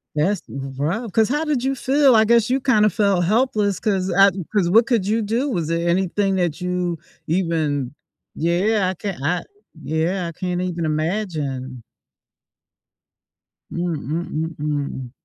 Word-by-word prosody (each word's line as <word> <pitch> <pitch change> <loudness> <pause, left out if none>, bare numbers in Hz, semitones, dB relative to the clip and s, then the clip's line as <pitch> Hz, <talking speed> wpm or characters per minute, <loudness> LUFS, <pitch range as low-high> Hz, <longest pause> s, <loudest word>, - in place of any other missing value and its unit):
That's 180 +6 +1
rough, 145 - -3
'cause 220 +3 +2
how 300 +3 0
did 280 -5 0
you 270 0 0
feel? 270 -1 +4
I 220 0 +5
guess 235 0 +3
you 265 +2 +2
kind 245 -6 +3
of 210 - +2
felt 200 -4 +2
helpless 210 -2 +1
'cause 190 -3 0
I 195 +2 +6 0.3
'cause 175 -4 +3
what 225 +4 +5
could 230 -7 +1
you 220 +2 +1
do? 235 +7 -1
Was 170 -9 -1
there 170 +1 -1
anything 190 +2 +1
that 175 -4 -1
you 180 -1 -1 0.3
even 155 -6 0 0.4
Yeah, 185 +4 +1
I - - -2
can't 195 -7 -5
I 175 +5 0 0.4
Yeah, 165 +5 -1
I - - -5
can't 180 -1 -2
even 175 -3 -2
imagine. 155 - -3 1.9
Mm 175 0 -2
mm 155 +3 -3
mm 160 +1 -3
mm. 145 -4 -3
180 Hz, 155 wpm, -21 LUFS, 160-215 Hz, 1.9 s, I